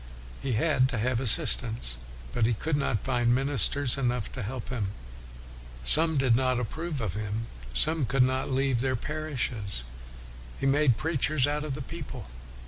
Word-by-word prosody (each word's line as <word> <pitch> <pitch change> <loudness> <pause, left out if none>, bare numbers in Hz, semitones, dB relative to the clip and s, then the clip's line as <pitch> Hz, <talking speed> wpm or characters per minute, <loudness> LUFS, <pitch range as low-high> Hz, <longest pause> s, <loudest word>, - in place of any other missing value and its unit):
He 135 - -2
had 130 +2 +2
to 125 - -2
have 120 +2 0
assistance, 115 - +4 0.4
but 115 -2 +2
he 120 - +1
could 155 +8 -2
not 125 -8 -1
find 120 -2 +2
ministers 135 0 +3
enough 125 -4 -1
to 125 - -6
help 120 +4 -6
him. 115 -7 -2 1.0
Some 160 - +2
did 130 -4 +3
not 130 0 +1
approve 155 +6 -4
of 105 -7 -3
him, 105 +1 -4 0.3
some 155 - +1
could 130 0 +3
not 130 +1 0
leave 135 -2 +1
their 130 0 0
parishes. 125 - -4 0.8
He - - -2
made 135 -3 +3
preachers 150 0 +1
out 150 +1 -1
of 145 -3 -4
the 145 - -5
people. 130 - -8
130 Hz, 160 wpm, -28 LUFS, 115-145 Hz, 1.0 s, assistance